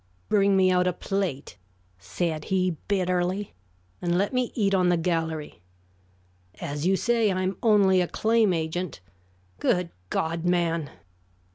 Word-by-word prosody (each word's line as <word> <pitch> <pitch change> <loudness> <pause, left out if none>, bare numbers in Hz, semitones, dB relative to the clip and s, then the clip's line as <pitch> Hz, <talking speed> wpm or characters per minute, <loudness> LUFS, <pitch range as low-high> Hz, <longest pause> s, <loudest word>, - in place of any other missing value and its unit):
"Bring 200 -1 +3
me 185 -1 +4
out 180 0 +2
a 180 - +1
plate," 180 - -3 0.4
said 155 - -3
he, 185 -2 0
bitterly, 185 0 0 0.5
"and 175 0 +1
let 200 +6 0
me 250 -1 0
eat 200 -4 +1
on 180 -2 +3
the 175 - +3
gallery. 160 - -2 1.0
As 145 +4 -3
you 195 - +4
say, 230 +1 +2
I 185 0 -1
am 185 +1 -1
only 200 -4 +4
a 175 - 0
claim 220 0 +2
agent. 165 - -3 0.6
Good 180 -2 +1 0.2
God, 165 +1 -1
man!" 170 -3 0
180 Hz, 140 wpm, -26 LUFS, 165-195 Hz, 1.0 s, me